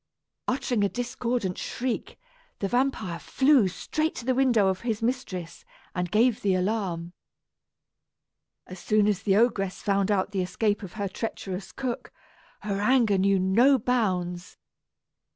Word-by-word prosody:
Uttering 250 -4 0
a 200 - +2
discordant 240 -5 -2
shriek, 250 -1 -3 0.4
the 200 - -2
vampire 245 -7 0
flew 265 -6 +3
straight 310 - -2
to 235 - -7
the 260 - +2
window 245 -6 +3
of 190 -1 0
his 225 -2 -2
mistress, 225 -9 -3 0.3
and 180 -1 -2
gave 225 +4 +3
the 195 -2 +2
alarm. 180 -3 -2 1.5
As 185 0 -10
soon 215 +2 +2
as 200 -3 +1
the 200 -2 +2
ogress 200 -4 +1
found 200 0 +1
out 200 -1 +1
the 195 -2 -1
escape 205 +4 0
of 195 -4 -8
her 205 -2 -2
treacherous 190 -2 -5
cook, 255 -3 -4 0.5
her 200 -1 -2
anger 225 -4 +3
knew 195 +1 +3
no 230 +9 +4
bounds. 185 -8 -1
205 Hz, 140 wpm, -26 LUFS, 190-245 Hz, 1.5 s, no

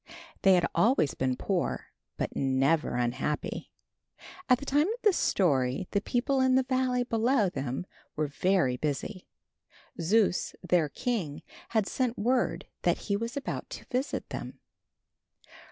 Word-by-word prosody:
They 190 -1 +6
had 175 -1 +3
always 225 - +3
been 130 -1 0
poor - - -2 0.3
but - - -3
never 135 +3 +2
unhappy. 125 +5 -2 0.8
At 250 - +6
the 280 - -8
time 290 +4 +3
of 460 +4 -3
this 420 -4 +5
story 135 -4 +1
the 200 - +1
people 260 +4 +1
in 260 0 +4
the 260 - +4
valley 255 -1 +1
below 230 -2 +2
them 135 +1 -3 0.3
were 155 - 0
very 145 -2 +1
busy. 155 - -3 0.7
Zeus, 190 +2 +2
their 170 -4 +3
king, 180 - -3 0.3
had 220 -3 +2
sent 245 +2 -1
word 245 +4 +1 0.2
that - - +2
he 200 - -2
was 230 +6 -3
about 280 - -4
to - - -8
visit 260 +3 -1
them. - - -6
200 Hz, 140 wpm, -29 LUFS, -, 0.8 s, They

